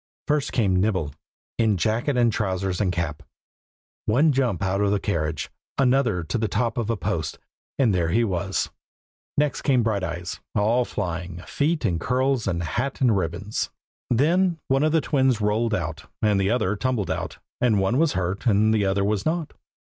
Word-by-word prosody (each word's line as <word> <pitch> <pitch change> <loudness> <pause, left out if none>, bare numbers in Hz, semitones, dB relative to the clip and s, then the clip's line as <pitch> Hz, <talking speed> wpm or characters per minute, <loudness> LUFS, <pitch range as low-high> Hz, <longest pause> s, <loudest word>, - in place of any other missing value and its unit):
First 145 -1 +1
came 95 -6 +2
Nibble, 95 -9 0 0.5
in 110 -4 +3
jacket 115 - 0
and 120 -2 +3
trousers 95 -2 -1
and 95 -3 +2
cap. 85 -4 -3 0.9
One 145 +8 +4
jump 125 - 0
out 95 +1 0
of 100 - +3
the 100 0 +1
carriage, 80 -6 -2 0.3
another 125 -8 +2
to 95 +9 -2
the 110 - +1
top 115 +4 -1
of 115 -2 -2
a 115 - 0
post, - - -2 0.4
and 125 -7 +3
there 85 -3 +1
he 115 +8 +3
was. 95 -2 -1 0.7
Next 145 -2 +1
came 130 -5 +3
Brighteyes, 95 -5 -2 0.2
all 115 +4 +3
flying, 90 -4 -4
feet 155 +3 0
and 85 -2 +1
curls 130 -2 +1
and 85 -2 -1
hat 125 +11 -2
and 120 -5 +4
ribbons. 90 +3 -2 0.4
Then 170 +8 +3
one 135 +1 +3
of 155 +1 +3
the 160 0 +3
twins 130 -5 +2
rolled 110 +2 +1
out, 80 -4 -4
and 105 -2 +2
the 95 - +1
other 110 -4 +1
tumbled 115 -3 -1
out; - - -4 0.2
and 115 -5 +3
one 95 +7 +2
was 165 -2 +3
hurt, 95 +4 -2
and 110 0 +4
the 105 -2 +2
other 100 +1 +1
was 105 -1 0
not. 160 -1 -1
105 Hz, 180 wpm, -24 LUFS, 95-125 Hz, 0.9 s, One